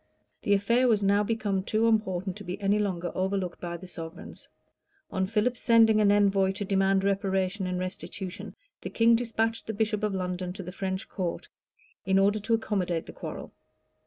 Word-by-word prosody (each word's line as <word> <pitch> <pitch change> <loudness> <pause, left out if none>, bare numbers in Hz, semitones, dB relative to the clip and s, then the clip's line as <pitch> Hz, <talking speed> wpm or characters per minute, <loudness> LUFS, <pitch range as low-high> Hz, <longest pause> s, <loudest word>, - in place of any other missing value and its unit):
The 200 - +3
affair 235 +6 +2
was 215 -4 +3
now 200 +1 +3
become 210 -3 -1
too 220 +4 +1
important 190 -4 0
to 205 - -9
be 180 +1 -5
any 205 +1 +2
longer 180 -4 -2
overlooked 190 -1 -2
by 170 -1 -4
the 185 +2 -11
sovereigns. 165 -2 -9 0.6
On 190 -1 0
Philip's 225 +4 0
sending 225 -2 +5
an 205 -1 +5
envoy 195 -2 +3
to 200 +1 -4
demand 195 0 +2
reparation 195 -1 0
and 180 0 -2
restitution, 185 0 -6 0.3
the - - -5
king 230 0 +4
despatched 225 -1 -1
the 220 - -2
bishop 215 0 0
of 210 -2 -1
London 180 -1 -3
to 195 0 -7
the 180 - -7
French 190 +1 -4
court, 180 -4 -4 0.5
in 190 0 +2
order 200 +2 +3
to 225 +3 +1
accommodate 185 -7 -1
the - - -10
quarrel. - - -7
195 Hz, 180 wpm, -28 LUFS, 185-215 Hz, 0.6 s, sending